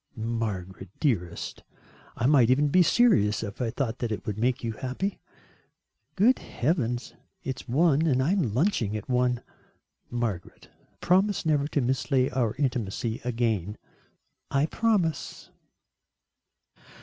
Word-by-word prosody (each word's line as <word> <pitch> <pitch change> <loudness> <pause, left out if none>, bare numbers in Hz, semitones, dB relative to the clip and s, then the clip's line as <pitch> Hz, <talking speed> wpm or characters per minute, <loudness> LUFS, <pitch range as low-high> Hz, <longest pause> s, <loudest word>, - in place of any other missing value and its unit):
"Margaret, 105 -5 -4
dearest, 90 - -1 0.6
I 115 - -1
might 130 -4 +5
even 145 +3 +3
be 180 +5 +5
serious 165 - +3
if 105 +3 -6
I 120 - 0
thought 120 0 -3
that 120 -2 -2
it 105 - -4
would 105 0 -3
make 125 +2 0
you 115 - -1
happy." 130 - -4 1.0
"Good 225 +7 +4
heavens, 125 -4 -2 0.3
it's 130 -1 -5
one, 155 +3 +3
and 130 -4 +2
I 135 +6 +2
am 195 -1 +2
lunching 115 - +1
at 105 - -8
one." 125 -1 +1 0.7
"Margaret, 115 -7 -4 0.3
promise 190 +2 +2
never 145 -2 +2
to 145 - 0
mislay 130 +1 +1
our 120 -4 0
intimacy 120 -4 -2
again." 110 -5 -1 0.7
"I 140 +1 +2
promise." 195 -5 -1
125 Hz, 125 wpm, -27 LUFS, 110-150 Hz, 1.0 s, might